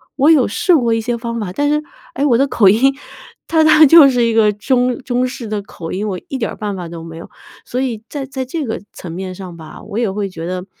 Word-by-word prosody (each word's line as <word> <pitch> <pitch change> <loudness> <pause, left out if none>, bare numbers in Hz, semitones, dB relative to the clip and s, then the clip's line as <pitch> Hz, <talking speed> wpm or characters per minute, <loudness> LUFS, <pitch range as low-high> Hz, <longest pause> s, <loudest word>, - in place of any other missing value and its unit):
我 280 +2 +3
有 280 -6 +4
试 340 - +2
过 235 -6 +2
一 225 - +1
些 240 +2 -2
方 235 0 -4
法， 205 -5 -4
但 290 +7 0
是， 300 0 +1 0.3
哎， 275 - -1
我 240 -5 +3
的 275 - +2
口 220 -6 +3
音 265 +7 +3 0.5
它 320 -1 +3
它 310 0 +7
就 305 -1 +8
是 245 -2 +1
一 230 - +1
个 220 -2 +4
中 250 +3 0
中 250 0 0
式 250 -2 -7
的 210 -1 -3
口 170 -4 -9
音， 200 +3 -3
我 190 -3 -3
一 270 - -4
点 225 - -1
儿 - - -8
办 205 -2 -4
法 180 -2 -6
都 165 -1 -8
没 165 0 -9
有。 165 - -10 0.4
所 250 - -3
以 235 -5 -3
在 285 -2 -5
在 265 0 -5
这 300 +3 -4
个 225 - -4
层 175 - -9
面 185 +2 -5
上 180 -3 -9
吧， 160 -1 -11
我 210 0 -7
也 225 -5 0
会 200 0 -3
觉 165 -3 -7
得 180 0 -4
230 Hz, 285 characters per minute, -17 LUFS, 195-265 Hz, 0.5 s, 就